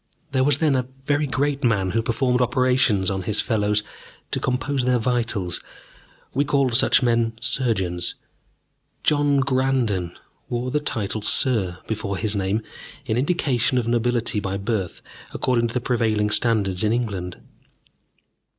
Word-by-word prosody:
There 130 -1 +2
was 140 -1 +3
then 150 -3 +2
a 125 -1 -1 0.2
very 145 +1 +1
great 140 +3 -1
man 100 -6 +1
who 115 - +1
performed 125 +2 +1
operations 125 -6 +2
on 95 -1 -2
his 105 +3 -1
fellows 105 -2 +1 0.5
to - - 0
compose 130 +1 -1
their 125 0 +2
vitals 115 -6 -1 0.7
we 140 - +2
called 140 -3 +1
such 125 +2 +4
men 115 -1 +2
surgeons. 110 -8 0 0.9
John 145 -2 +3
Granden 130 -9 0 0.3
wore 125 +1 -2
the 150 - +1
title 110 -7 -2
"Sir" 105 -5 +2
before 100 -3 -3
his 110 +1 -1
name, 100 +3 -1 0.4
in 110 -4 -1
indication 130 -3 +1
of 120 -2 0
nobility 120 -1 0
by 100 -1 -3
birth 100 -2 -3 0.3
according 120 -2 +1
to 115 - -7
the - - +2
prevailing 110 -4 0
standards 105 -5 +2
in 105 - +2
England. 100 -7 -3
120 Hz, 140 wpm, -23 LUFS, 105-130 Hz, 0.9 s, such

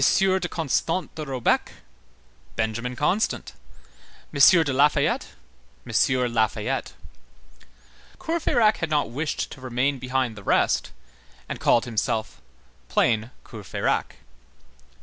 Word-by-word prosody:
de 190 -1 +3
Constant 165 +3 -1
de 155 - -6
Robecque, 130 -4 0 0.8
Benjamin 115 +3 -2
Constant; 180 - 0 0.8
M. 160 +4 +7
de 145 -3 -2
Lafayette, 145 +3 +2 0.6
M. 125 +1 +1
Lafayette. 110 -2 -1 1.2
Courfeyrac 280 -10 +1
had 165 - -3
not 150 -4 0
wished 150 +5 -3
to 130 - -10
remain 130 +2 -1
behind 125 -2 -1
the 105 - -10
rest, - - +1 0.6
and - - -5
called 120 - +3
himself 110 -1 -2 0.5
plain 110 0 +1 0.2
Courfeyrac. - - -3
130 Hz, 100 wpm, -24 LUFS, 120-160 Hz, 1.2 s, M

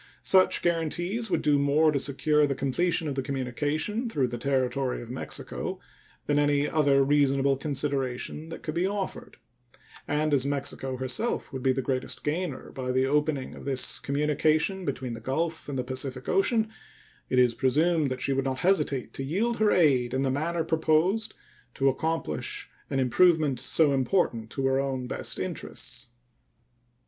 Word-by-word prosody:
Such 190 -1 +4
guaranties 175 +6 -1
would - - 0
do 145 -1 +3
more 150 +3 +3
to 140 - 0
secure 150 +2 +2
the 140 - -1
completion 160 +5 0
of 145 - -2
the 135 - -1
communication 145 - -2
through 135 - 0
the 120 - -4
territory 130 0 0
of 120 0 -8
Mexico 130 - -4 0.5
than 145 0 +2
any 145 0 +2
other 140 -3 +3
reasonable 140 -1 +3
consideration 140 +1 -3
that 165 - -8
could 155 - -3
be 175 +3 +1
offered; 200 -1 -5 0.7
and 150 0 0
as 135 -3 +3
Mexico 140 -2 -2
herself 130 - -2
would 130 - -4
be 130 - +3
the 135 0 -1
greatest 130 0 -2
gainer 155 -1 -3
by 130 -1 -3
the 130 +1 +2
opening 145 -1 0
of - - -11
this 135 -2 +1
communication 155 +6 +1
between 130 -3 -3
the 115 - -6
Gulf 160 +6 -2
and 140 - -3
the 125 - -1
Pacific 130 0 -3
Ocean, 220 +3 +2 0.6
it 130 - 0
is 125 -2 +5
presumed 150 +5 +2
that 130 0 -4
she 135 - 0
would 135 0 0
not 130 -1 -1
hesitate 150 -9 +1
to 135 - -4
yield 210 - 0
her 215 -1 +4
aid 130 -9 +3
in 135 - +1
the 135 - +1
manner 165 +4 -1
proposed 160 +6 +1 0.4
to 135 0 +3
accomplish 160 - -2 0.2
an 135 - 0
improvement 145 +3 +3
so 150 -3 +2
important 130 - 0
to 135 +2 -2
her 135 0 +2
own 135 -2 -2
best - - -2
interests. - - -5
140 Hz, 165 wpm, -27 LUFS, 130-160 Hz, 0.7 s, is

